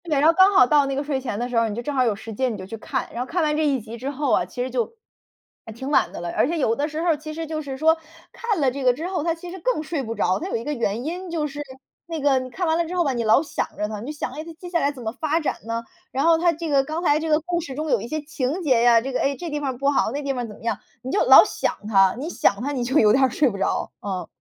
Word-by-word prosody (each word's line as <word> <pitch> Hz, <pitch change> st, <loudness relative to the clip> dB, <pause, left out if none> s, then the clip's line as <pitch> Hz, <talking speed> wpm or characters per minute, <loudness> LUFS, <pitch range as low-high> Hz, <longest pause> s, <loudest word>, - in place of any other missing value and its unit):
对， 305 Hz, -4 st, +1 dB
然 300 Hz, -, +5 dB
后 330 Hz, -, +6 dB
刚 375 Hz, +3 st, +6 dB
好 255 Hz, -, +7 dB
到 290 Hz, +2 st, +4 dB
那 275 Hz, -, -2 dB
个 280 Hz, -, -1 dB
睡 280 Hz, -2 st, -2 dB
前 240 Hz, -6 st, -4 dB
的 240 Hz, +2 st, -2 dB
时 250 Hz, -, -5 dB
候， 230 Hz, 0 st, +3 dB
你 205 Hz, -, -4 dB
就 240 Hz, -, -3 dB
正 290 Hz, +4 st, -4 dB
好 260 Hz, -2 st, +3 dB
有 225 Hz, -4 st, +1 dB
时 220 Hz, +2 st, -8 dB
间 255 Hz, +4 st, 0 dB
你 215 Hz, -, -5 dB
就 185 Hz, -, -7 dB
去 195 Hz, -, -7 dB
看， 260 Hz, +4 st, -3 dB
然 235 Hz, -, -3 dB
后 -, -, -8 dB
看 350 Hz, 0 st, 0 dB
完 300 Hz, -1 st, +1 dB
这 310 Hz, 0 st, +1 dB
一 275 Hz, -3 st, +2 dB
集 225 Hz, +1 st, -9 dB
之 260 Hz, +4 st, -4 dB
后 285 Hz, -2 st, -1 dB
啊， -, -, +3 dB
其 245 Hz, -, -4 dB
实 255 Hz, -, -3 dB
就 245 Hz, -, -2 dB, 0.7 s
还 -, -, -8 dB
挺 265 Hz, +6 st, -6 dB
晚 -, -, +3 dB
的 -, -, -7 dB
了。 175 Hz, 0 st, -4 dB
而 -, -, +3 dB
且 335 Hz, +3 st, -1 dB
有 230 Hz, -7 st, +1 dB
的 285 Hz, +3 st, -1 dB
时 310 Hz, +1 st, -4 dB
候 340 Hz, -2 st, +3 dB
其 310 Hz, +1 st, -8 dB
实 325 Hz, 0 st, -4 dB
就 310 Hz, 0 st, -4 dB
是 275 Hz, -3 st, -6 dB
说， 320 Hz, +3 st, +4 dB, 0.4 s
看 440 Hz, -6 st, -2 dB
了 270 Hz, -3 st, +3 dB
这 275 Hz, +1 st, -5 dB
个 250 Hz, -1 st, +5 dB
之 315 Hz, +8 st, -5 dB
后 365 Hz, -5 st, -2 dB
它 335 Hz, 0 st, +1 dB
其 345 Hz, +1 st, -9 dB
实 380 Hz, -, -8 dB
更 -, -, 0 dB
睡 310 Hz, -2 st, -3 dB
不 230 Hz, -3 st, -5 dB
着， 185 Hz, -3 st, +1 dB
它 360 Hz, -, -5 dB
有 -, -, -2 dB
一 230 Hz, -, -2 dB
个 295 Hz, -, -2 dB
原 230 Hz, -3 st, -1 dB
因 360 Hz, +3 st, -4 dB
就 325 Hz, -3 st, -1 dB
是 290 Hz, 0 st, -5 dB, 0.5 s
那 330 Hz, -1 st, -4 dB
个 275 Hz, -2 st, +3 dB
你 255 Hz, 0 st, -6 dB
看 360 Hz, +8 st, -3 dB
完 320 Hz, -1 st, +2 dB
了 340 Hz, -, +1 dB
之 350 Hz, +3 st, -5 dB
后 355 Hz, -, +3 dB
吧 275 Hz, -, +1 dB
你 235 Hz, -2 st, -1 dB
老 220 Hz, +7 st, +5 dB
想 310 Hz, -, -2 dB
着 210 Hz, -, -1 dB
它， 210 Hz, -1 st, -5 dB
你 255 Hz, +7 st, -5 dB
想 300 Hz, -, -4 dB
它 310 Hz, -, -6 dB, 0.2 s
接 360 Hz, -, -8 dB
下 345 Hz, -1 st, +1 dB
来 285 Hz, -2 st, +1 dB
怎 260 Hz, -4 st, -10 dB
么 220 Hz, -, -2 dB
发 310 Hz, +5 st, 0 dB
展 305 Hz, -, -1 dB
呢？ 230 Hz, 0 st, -2 dB, 0.3 s
然 275 Hz, +3 st, 0 dB
后 335 Hz, 0 st, +6 dB
它 340 Hz, +1 st, +3 dB
这 335 Hz, +1 st, -5 dB
个 280 Hz, -3 st, +3 dB
刚 315 Hz, +4 st, -4 dB
才 295 Hz, -3 st, +3 dB
这 320 Hz, 0 st, -3 dB
个 305 Hz, 0 st, +4 dB
故 345 Hz, +2 st, -2 dB
事 275 Hz, -5 st, -7 dB
中 305 Hz, +1 st, -3 dB
有 240 Hz, -5 st, +2 dB
一 230 Hz, -, -6 dB
些 310 Hz, +5 st, -2 dB
情 295 Hz, +3 st, -3 dB
节 255 Hz, -6 st, +3 dB
啊， 235 Hz, -1 st, +6 dB
这 265 Hz, +2 st, -5 dB
个 -, -, 0 dB
哎， 280 Hz, 0 st, +1 dB
这 345 Hz, -2 st, -6 dB
地 295 Hz, -, -2 dB
方 270 Hz, -4 st, -3 dB
不 275 Hz, +2 st, -1 dB
好 280 Hz, -5 st, +2 dB
那 285 Hz, +3 st, -4 dB
地 275 Hz, -1 st, -1 dB
方 245 Hz, -2 st, -3 dB
怎 210 Hz, -, -10 dB
么 -, -, -17 dB
样， 225 Hz, -3 st, -1 dB, 0.2 s
你 260 Hz, -, -4 dB
就 410 Hz, -, +2 dB
老 -, -, +10 dB
想 -, -, -2 dB
它， 195 Hz, -3 st, +4 dB
你 280 Hz, +5 st, -4 dB
想 200 Hz, -, +1 dB
它 285 Hz, -, -1 dB
你 260 Hz, -4 st, -2 dB
就 260 Hz, +5 st, +1 dB
有 215 Hz, -6 st, +6 dB
点 265 Hz, +1 st, +4 dB
睡 285 Hz, +4 st, +2 dB
不 -, -, -7 dB
着。 195 Hz, -, -1 dB
嗯。 185 Hz, -4 st, -4 dB
280 Hz, 360 characters per minute, -23 LUFS, 240-315 Hz, 0.7 s, 老